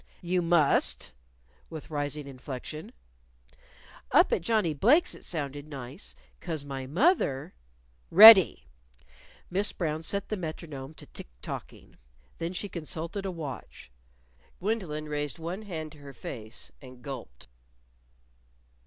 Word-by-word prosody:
"You 180 +1 +1
must," 165 -4 +2 0.6
with 160 -1 -9
rising 145 -1 -3
inflection. 135 +3 -7 1.2
"Up - - +5
at - - +1
Johnnie 205 -3 +1
Blake's 250 - +4
it - - -12
sounded 145 -3 -4
nice. 135 - -6 0.2
'Cause 160 -5 -4
my 135 -2 -5
moth 290 - +4
er 135 -1 -3 0.3
" - - -36
"Ready!" 220 -5 +11 0.9
Miss 200 +3 +1
Brown 160 -3 -2
set 200 +5 0
the 215 - -2
metronome 155 -4 -6
to - - -11
tick - - -9 0.2
tocking. - - -8 0.4
Then 165 +1 -2
she 205 - -3
consulted 170 +2 -5
a - - -2
watch. 150 - -8 0.7
Gwendolyn 180 -7 -2
raised 145 -2 -3
one 170 +5 -5
hand 160 -7 -6
to 150 - -15
her 140 -1 -11
face, 110 -2 -8
and 130 -2 -13
gulped. 130 - -8
155 Hz, 125 wpm, -29 LUFS, 140-180 Hz, 1.2 s, Ready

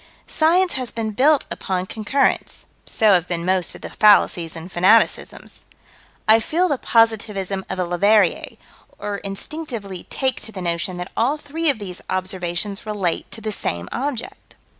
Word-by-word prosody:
Science 350 +3 +2
has 255 -2 -1
been 225 -2 -3
built 280 +6 +3
upon 185 -1 -2
concurrence: 220 +8 -1 0.2
so 215 -2 +3
have 180 -2 +2
been 170 -1 -3
most 185 -1 +1
of - - -12
the - - -8
fallacies 180 -6 +4
and 165 +3 -8
fanaticisms. 190 +6 +2 0.6
I 220 +1 +7
feel 335 +11 +1
the 285 -6 -1
positivism 210 -4 +1
of 190 - -3
a 180 - 0
Leverrier, 195 +2 +2 0.4
or 205 -1 -4
instinctively 200 - -6
take 265 -2 0
to 220 - -2
the 200 - -8
notion 175 +1 -2
that 180 +1 -6
all 260 +7 +1
three 315 +2 -2
of 275 - +1
these 190 -4 -6
observations 185 +1 -3
relate 205 -5 -2
to 225 - -6
the 215 0 -3
same 85 - -3
object. 255 -3 -5
205 Hz, 160 wpm, -21 LUFS, 185-245 Hz, 0.6 s, I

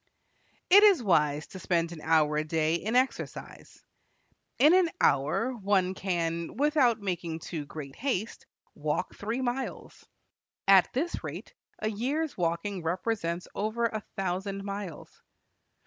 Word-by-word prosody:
It 400 +2 +10
is 400 - +6
wise 150 -6 +2
to 190 - -9
spend 170 -1 0
an 165 -3 -8
hour 155 -2 +3
a 155 - +1
day 155 0 0
in 210 +7 -1
exercise. 260 +1 -2 0.7
In 300 +5 +6
an 365 -2 +5
hour 145 - +2
one 195 -4 +1
can, 170 -3 -2
without 280 -5 +3
making 175 -5 -3
too 160 -2 -6
great 140 -3 -8
haste, 230 -5 -3 0.3
walk - - -2
three 225 +5 -3
miles. 255 +1 -4 0.6
At 195 -2 +6
this 320 +7 -2
rate, - - -7 0.2
a 215 - -2
year's 280 +9 -2
walking 175 +3 -2
represents 175 0 -2
over 220 +3 -1
a 220 -2 -2 0.2
thousand 195 +1 -2
miles. 200 -5 -7
195 Hz, 130 wpm, -29 LUFS, 165-235 Hz, 0.7 s, It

